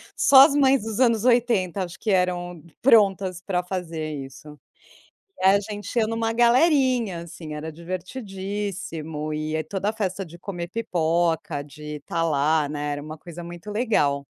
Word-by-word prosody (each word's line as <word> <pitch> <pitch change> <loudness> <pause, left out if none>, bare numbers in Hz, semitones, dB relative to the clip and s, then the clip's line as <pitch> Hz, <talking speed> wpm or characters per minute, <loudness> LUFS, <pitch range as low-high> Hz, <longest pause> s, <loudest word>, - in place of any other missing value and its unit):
só 270 0 +8
as 285 -1 +1
mães 270 -2 +4
dos 220 0 -4
anos 230 -4 +3
80, 230 -7 +2
acho 180 0 -8
que 220 - -3
eram 180 -3 0 0.2
prontas 195 -7 +3
para 180 -3 0
fazer 165 -4 -4
isso. 145 +2 -10 0.8
E - - -6
a 195 +1 +6
gente 205 0 -7
ia 220 - +2
numa 225 0 -1
galerinha, 245 - +3
assim, 160 -2 -9
era 155 +1 -5
divertidíssimo. 185 - -5
E 155 +1 -3
é 155 - -1
toda 200 +3 -2
a - - -3
festa 195 -3 -3
de 170 0 -13
comer 175 -2 -6
pipoca, 170 -6 0
de 150 +1 -8
estar 165 +3 -3
lá, 150 -1 +2
né, 145 0 -3
era 145 - -5
uma 155 +1 -8
coisa 170 +1 -10
muito 175 +4 -9
legal. 205 - +1
180 Hz, 165 wpm, -24 LUFS, 160-215 Hz, 0.8 s, só